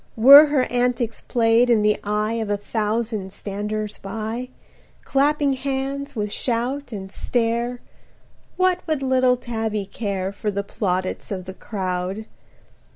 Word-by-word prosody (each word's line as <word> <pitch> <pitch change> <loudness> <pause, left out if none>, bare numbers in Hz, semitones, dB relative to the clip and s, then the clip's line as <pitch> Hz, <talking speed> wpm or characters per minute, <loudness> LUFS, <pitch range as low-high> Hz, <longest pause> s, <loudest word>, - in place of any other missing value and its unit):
Were 280 +6 +10
her 285 -3 +2
antics 245 -2 0
played 235 0 +3
in 225 -3 +4
the 210 0 +3
eye 210 +2 -1
Of 215 - -4
a 205 - +1
thousand 215 -1 -2
standers 210 +2 -4
by, 225 +5 -5 0.5
Clapping 285 0 +2
hands 275 +1 -3
with 210 -2 -2
shout 250 +5 -2
and 190 -3 -7
stare, 240 +2 -1 0.8
What 370 -1 +3
would 310 -4 -1
little 255 -1 +3
Tabby 220 -4 -3
care 195 -2 -3
For 205 +1 -3
the 200 0 -2
plaudits 185 -2 -2
of 185 -3 -4
the 190 - -7
crowd? 190 +1 -4
225 Hz, 135 wpm, -22 LUFS, 205-255 Hz, 0.8 s, Were